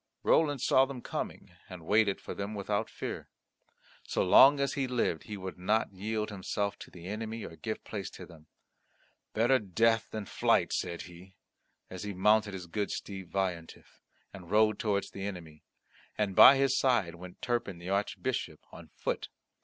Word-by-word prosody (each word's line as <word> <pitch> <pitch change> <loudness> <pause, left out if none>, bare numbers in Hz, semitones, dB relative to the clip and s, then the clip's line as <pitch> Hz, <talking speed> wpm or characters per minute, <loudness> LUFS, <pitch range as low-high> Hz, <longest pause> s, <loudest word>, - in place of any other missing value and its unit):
Roland 145 -5 +3
saw 130 0 +4
them 130 -3 -8
coming, - - -5 0.2
and 90 -3 -10
waited 105 +1 +3
for - - -7
them 100 +2 -5
without 105 +2 -2
fear. - - -6 0.7
So - - -1
long 135 +10 +7
as 140 -1 0
he 135 -2 -1
lived 120 -10 -1
he 105 - -6
would 95 -1 -7
not 105 +3 +1
yield 105 +3 -3
himself 100 +1 -3
to - - -10
the 85 -1 -12
enemy 110 +3 -5
or 80 - -9
give 110 +5 -5
place 100 -3 -5
to - - -9
them. 80 -3 -16 0.9
"Better 120 +4 +3
death 115 +2 +1
than 110 -2 -5
flight," - - +1
said 85 -1 -3
he, 90 +2 -14 0.5
as 95 - -8
he 105 -1 -4
mounted 105 +1 +3
his 90 -2 -7
good 100 +4 -3
steed 95 -4 -6
Veillantif, 90 -4 -4 0.3
and 90 -3 -11
rode 110 +1 +3
towards 100 -2 -1
the 95 - -7
enemy. 80 -6 -8 0.6
And 100 -3 -1
by 135 - +10
his 135 -1 +2
side 120 -11 +2
went 90 +1 -11
Turpin 120 -7 -2
the 85 +2 -8
Archbishop 100 +1 -2
on - - -12
foot. - - -3
100 Hz, 170 wpm, -30 LUFS, 90-110 Hz, 0.9 s, by